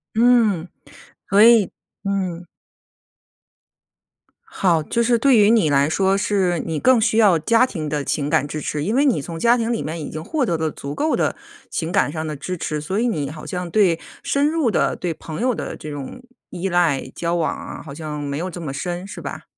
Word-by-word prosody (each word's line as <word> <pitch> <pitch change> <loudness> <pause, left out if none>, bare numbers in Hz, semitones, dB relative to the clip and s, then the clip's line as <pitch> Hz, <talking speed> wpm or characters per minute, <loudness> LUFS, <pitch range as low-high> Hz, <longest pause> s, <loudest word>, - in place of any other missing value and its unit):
嗯， 225 -7 +3 0.6
所 200 +1 +6
以 230 -3 +7 0.4
嗯。 185 -3 -2 2.0
好， 170 -5 +1
就 235 - -1
是 235 0 +3
对 255 0 +4
于 210 0 +6
你 220 -9 +4
来 140 0 +3
说， 195 +3 +2
是 195 -4 +1
你 160 -1 -3
更 255 - +4
需 220 0 +1
要 200 -7 +5
家 230 +9 +4
庭 160 -11 -5
的 150 -1 -2
情 145 +1 -1
感 145 - +2
支 155 +1 -5
持， 150 0 -3
因 215 +8 -1
为 280 +3 +3
你 245 - +2
从 165 +3 -7
家 235 +6 +4
庭 230 0 -1
里 235 - -1
面 160 +2 -4
已 - - -5
经 155 +1 -6
获 300 - -1
得 170 -7 0
了 160 0 -1
足 140 0 -7
够 310 - 0
的 - - 0 0.3
情 165 0 -3
感 190 -6 +2
上 155 0 -4
的 155 -1 -4
支 180 +6 -5
持， 155 -2 -3
所 190 +8 -2
以 245 - +1
你 150 - -2
好 155 +1 -9
像 180 -1 -4
对 180 -4 +3 0.2
深 285 +2 +1
入 315 -6 +1
的 - - +1
对 175 -2 -3
朋 160 +3 -7
友 250 -1 +1
的 - - -5
这 155 - -8
种 145 - -7 0.3
依 180 +2 -4
赖 170 -6 +2
交 170 0 -1
往 165 -2 0
啊， - - -8
好 140 - -9
像 150 -1 -6
没 140 0 -3
有 180 +3 -3
这 175 - -8
么 145 -5 -5
深 175 +5 -4
是 - - -8
吧？ - - -6
175 Hz, 230 characters per minute, -21 LUFS, 155-225 Hz, 2.0 s, 以